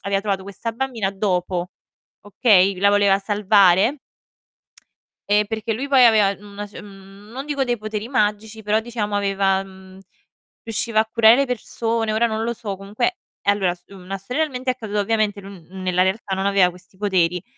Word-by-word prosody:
aveva 195 Hz, 0 st, 0 dB
trovato 200 Hz, -2 st, -2 dB
questa 200 Hz, +4 st, -5 dB
bambina 230 Hz, -5 st, -2 dB
dopo, 180 Hz, -3 st, -2 dB, 0.5 s
okay. 200 Hz, -3 st, +3 dB
La 200 Hz, +1 st, +4 dB
voleva 200 Hz, -1 st, +3 dB
salvare 205 Hz, +3 st, +3 dB, 1.3 s
e 210 Hz, 0 st, +3 dB
perché 220 Hz, +1 st, -3 dB
lui 265 Hz, +6 st, -4 dB
poi 265 Hz, -3 st, +6 dB
aveva 210 Hz, -4 st, +4 dB
una 205 Hz, 0 st, -8 dB
c 200 Hz, -, -23 dB
n 195 Hz, 0 st, -14 dB
non 270 Hz, +3 st, -6 dB
dico 285 Hz, -2 st, 0 dB
dei 245 Hz, -2 st, -1 dB
poteri 215 Hz, 0 st, -5 dB
magici, 215 Hz, -2 st, -1 dB
però 210 Hz, +1 st, +1 dB
diciamo 220 Hz, -3 st, -4 dB
aveva 195 Hz, -1 st, +1 dB
mhmm, 190 Hz, -1 st, -15 dB, 0.7 s
riusciva 225 Hz, 0 st, -1 dB
a 220 Hz, -, +3 dB
curare 225 Hz, 0 st, +6 dB
le 275 Hz, -, +2 dB
persone, 230 Hz, -2 st, -1 dB
ora 230 Hz, +2 st, +2 dB
non 220 Hz, 0 st, -3 dB
lo 235 Hz, +1 st, -1 dB
so 215 Hz, -4 st, -5 dB
comunque 210 Hz, -, -2 dB, 0.2 s
e 200 Hz, -, +3 dB
allora 195 Hz, -3 st, 0 dB
s 175 Hz, -, -21 dB
una 195 Hz, 0 st, -7 dB
storia 250 Hz, +11 st, -2 dB
realmente 260 Hz, -4 st, -4 dB
accaduta, 220 Hz, -4 st, -4 dB
ovviamente 210 Hz, -1 st, 0 dB
lui 195 Hz, -1 st, -11 dB
n 190 Hz, +1 st, -10 dB
nella 185 Hz, 0 st, +1 dB
realtà 190 Hz, 0 st, -2 dB
non 190 Hz, +1 st, -2 dB
aveva 195 Hz, -2 st, +4 dB
questi 180 Hz, +2 st, -17 dB
poteri 180 Hz, -4 st, 0 dB
205 Hz, 175 wpm, -21 LUFS, 195-225 Hz, 1.3 s, poi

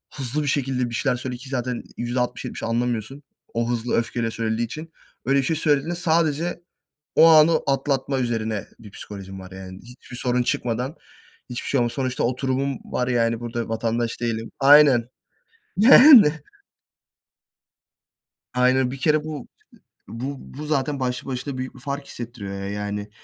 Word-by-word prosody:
hızlı 140 Hz, +2 st, -2 dB
bir -, -, -3 dB
şekilde 130 Hz, -3 st, 0 dB
bir 115 Hz, -, -5 dB
şeyler 130 Hz, -1 st, +1 dB
söyledi 125 Hz, -1 st, -5 dB
ki 130 Hz, -, -10 dB
zaten 125 Hz, -2 st, -3 dB
%60-70 125 Hz, 0 st, -3 dB
anlamıyorsun. 120 Hz, +3 st, -2 dB, 0.3 s
O 115 Hz, +1 st, -1 dB
hızlı 120 Hz, 0 st, -1 dB
öfkeyle 115 Hz, 0 st, -1 dB
söylediği 115 Hz, +1 st, -1 dB
için. 155 Hz, +7 st, -9 dB, 0.3 s
Öyle 135 Hz, +1 st, +3 dB
bir -, -, 0 dB
şey 160 Hz, -, 0 dB
söylediğinde 155 Hz, +2 st, +1 dB
sadece 170 Hz, 0 st, 0 dB, 0.5 s
o 165 Hz, -, +8 dB
anı 160 Hz, 0 st, +6 dB
atlatma 135 Hz, -1 st, 0 dB
üzerine 110 Hz, -4 st, -2 dB
bir 105 Hz, -3 st, -13 dB
psikolojim 95 Hz, -2 st, -9 dB
var. 95 Hz, 0 st, -11 dB
Yani, 95 Hz, 0 st, -9 dB
hiçbir 125 Hz, 0 st, -13 dB
sorun 125 Hz, -1 st, 0 dB
çıkmadan 125 Hz, +6 st, -2 dB, 0.5 s
hiçbir 120 Hz, -, -5 dB
şey 135 Hz, -, +2 dB
olmaz. 120 Hz, -1 st, +1 dB
Sonuçta 130 Hz, -2 st, -2 dB
oturumum 130 Hz, +1 st, -1 dB
var. 125 Hz, 0 st, -2 dB
Yani, 115 Hz, -2 st, +1 dB
burada 120 Hz, -1 st, -4 dB
vatandaş 115 Hz, +1 st, -2 dB
değilim. 115 Hz, -1 st, -3 dB
Aynen. 135 Hz, -4 st, +6 dB, 0.7 s
Yani. 240 Hz, -, +9 dB, 2.2 s
Aynen, 125 Hz, 0 st, +2 dB
bir 135 Hz, -, -7 dB
kere 150 Hz, +1 st, +2 dB
bu, 150 Hz, -4 st, -6 dB, 0.6 s
bu, 130 Hz, +5 st, -5 dB, 0.2 s
bu 150 Hz, -, -5 dB
zaten 140 Hz, -1 st, -1 dB
başlı 125 Hz, 0 st, -2 dB
başına 130 Hz, +1 st, -4 dB
büyük 130 Hz, +1 st, -5 dB
bir 130 Hz, -, -14 dB
fark 140 Hz, +1 st, -5 dB
hissettiriyor. 100 Hz, -5 st, -7 dB
Yani, 105 Hz, 0 st, -4 dB
125 Hz, 145 wpm, -23 LUFS, 115-140 Hz, 2.2 s, Yani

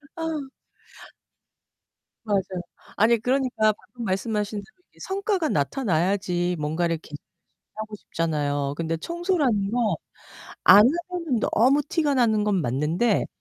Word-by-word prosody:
아. 320 Hz, -4 st, -4 dB, 1.7 s
맞아요. 205 Hz, -3 st, +1 dB, 0.6 s
아니, 230 Hz, +2 st, +4 dB
그러니까 245 Hz, -2 st, +1 dB
방금 235 Hz, +3 st, -10 dB
말씀하신 210 Hz, +1 st, -1 dB
대로 205 Hz, -, -16 dB
이게 -, -, -24 dB
성과가 385 Hz, -4 st, -1 dB
나타나야지 180 Hz, -, 0 dB
뭔가를 165 Hz, +3 st, 0 dB
계속 150 Hz, -2 st, -10 dB, 0.6 s
하고 215 Hz, 0 st, -5 dB
싶잖아요. 145 Hz, -6 st, -2 dB
근데 165 Hz, 0 st, -2 dB
청소라는 295 Hz, -, 0 dB
건 230 Hz, -6 st, +1 dB, 0.7 s
안 200 Hz, +3 st, +9 dB, 0.3 s
하면은 335 Hz, -10 st, -1 dB
너무 265 Hz, +6 st, +4 dB
티가 305 Hz, -5 st, +1 dB
나는 225 Hz, -5 st, +3 dB
건 205 Hz, -3 st, +1 dB
맞는데 155 Hz, -, +1 dB
210 Hz, 270 characters per minute, -24 LUFS, 175-265 Hz, 1.7 s, 안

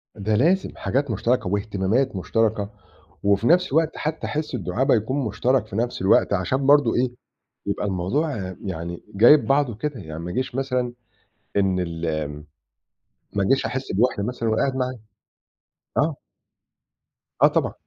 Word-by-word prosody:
ده 105 Hz, +1 st, 0 dB
لازم 175 Hz, -, +3 dB
حاجات 135 Hz, -1 st, -1 dB
مُشترَكة 115 Hz, +1 st, 0 dB
واهتمامات 100 Hz, +5 st, 0 dB
مُشترَكة 110 Hz, +1 st, 0 dB, 0.5 s
وفي 100 Hz, +3 st, +2 dB
نَفْس 180 Hz, 0 st, +4 dB
الوقت 160 Hz, +2 st, +1 dB
حتّى 155 Hz, +1 st, -3 dB
حِس 150 Hz, -2 st, -3 dB
الدُعابة 115 Hz, +5 st, +1 dB
يكون 130 Hz, +5 st, -1 dB
مُشترَك 120 Hz, +1 st, +1 dB
في 100 Hz, -, -8 dB
نَفْس 120 Hz, -2 st, -1 dB
الوقت 95 Hz, +1 st, +4 dB
عشان 130 Hz, +9 st, 0 dB
برضه 145 Hz, -4 st, +5 dB
إيه، 125 Hz, 0 st, +1 dB, 0.6 s
يبقى -, -, -1 dB
الموضوع 95 Hz, -, -1 dB
يعني 85 Hz, -2 st, -5 dB
جايب 120 Hz, +9 st, +6 dB
بعضه 135 Hz, -3 st, +2 dB
كده، 130 Hz, +2 st, -4 dB
يعني 80 Hz, -3 st, -7 dB
ما 85 Hz, -, -5 dB
ييجيش 130 Hz, +6 st, -2 dB
مثلًا 125 Hz, -2 st, -1 dB, 0.7 s
إن 95 Hz, -2 st, +2 dB
ال 85 Hz, -1 st, -3 dB, 1.3 s
ما 100 Hz, -1 st, 0 dB
أجيش 135 Hz, +7 st, +2 dB
أحِس 130 Hz, +1 st, -4 dB
بوِحدة 105 Hz, +1 st, +1 dB
مثلًا 115 Hz, +1 st, -2 dB
وأنا 110 Hz, -, +1 dB
قاعد 135 Hz, -1 st, 0 dB
معاه. 130 Hz, -1 st, -2 dB, 1.0 s
آه. 150 Hz, 0 st, +2 dB, 1.3 s
آه -, -, +9 dB
طبعًا. -, -, 0 dB
120 Hz, 145 wpm, -23 LUFS, 100-135 Hz, 1.3 s, آه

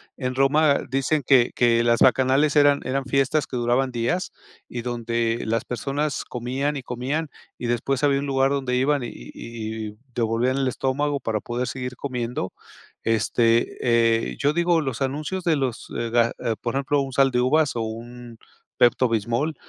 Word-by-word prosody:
En 130 Hz, -2 st, -3 dB
Roma 140 Hz, +2 st, +3 dB
dicen 135 Hz, +3 st, +1 dB
que 125 Hz, -3 st, +5 dB
que 120 Hz, -1 st, +3 dB
las 115 Hz, 0 st, +3 dB
bacanales 130 Hz, +4 st, +4 dB
eran 145 Hz, -1 st, +5 dB
eran 135 Hz, +1 st, -1 dB
fiestas 140 Hz, +3 st, +1 dB
que 125 Hz, -, -5 dB
duraban 120 Hz, +2 st, +1 dB
días, 125 Hz, +10 st, -1 dB, 0.4 s
y 120 Hz, -1 st, -5 dB
donde 115 Hz, -1 st, -1 dB
las 115 Hz, +1 st, -1 dB
personas 140 Hz, +5 st, -2 dB
comían, 130 Hz, +4 st, -3 dB
y -, -, -4 dB
comían, 135 Hz, +6 st, -3 dB, 0.3 s
y 120 Hz, -, -4 dB
después 125 Hz, +3 st, -1 dB
había 140 Hz, -1 st, +3 dB
un 140 Hz, -, -3 dB
lugar 135 Hz, -1 st, +2 dB
donde 135 Hz, -3 st, -1 dB
iban, 140 Hz, +1 st, +1 dB
y -, -, -3 dB
y 110 Hz, -, -7 dB
y 105 Hz, -, -14 dB, 0.2 s
devolvían 120 Hz, +3 st, +1 dB
el 135 Hz, -1 st, +1 dB
estómago 140 Hz, +3 st, -1 dB
para 110 Hz, -4 st, -2 dB
poder 120 Hz, +1 st, -3 dB
seguir 125 Hz, 0 st, -5 dB
comiendo. 125 Hz, -7 st, -4 dB, 0.5 s
Este, 115 Hz, +1 st, +2 dB
eh, 115 Hz, -, +2 dB
yo 145 Hz, +1 st, +2 dB
digo 170 Hz, 0 st, +2 dB
los 135 Hz, -5 st, -4 dB
anuncios 150 Hz, +7 st, -2 dB
de 165 Hz, -3 st, +2 dB
los, 130 Hz, -4 st, -3 dB
eh 115 Hz, -, -2 dB
ga 115 Hz, 0 st, +3 dB
ah, 115 Hz, -, -1 dB
por 120 Hz, -, -2 dB
ejemplo, 140 Hz, +1 st, +1 dB
un 135 Hz, -1 st, -4 dB
Sal 135 Hz, 0 st, +4 dB
de 125 Hz, 0 st, +1 dB
Uvas 145 Hz, +3 st, +2 dB
o 115 Hz, -, -1 dB
un 115 Hz, +1 st, -7 dB, 0.4 s
Pepto 120 Hz, +1 st, +4 dB
Bismol 120 Hz, +8 st, -1 dB
125 Hz, 175 wpm, -23 LUFS, 115-140 Hz, 0.5 s, que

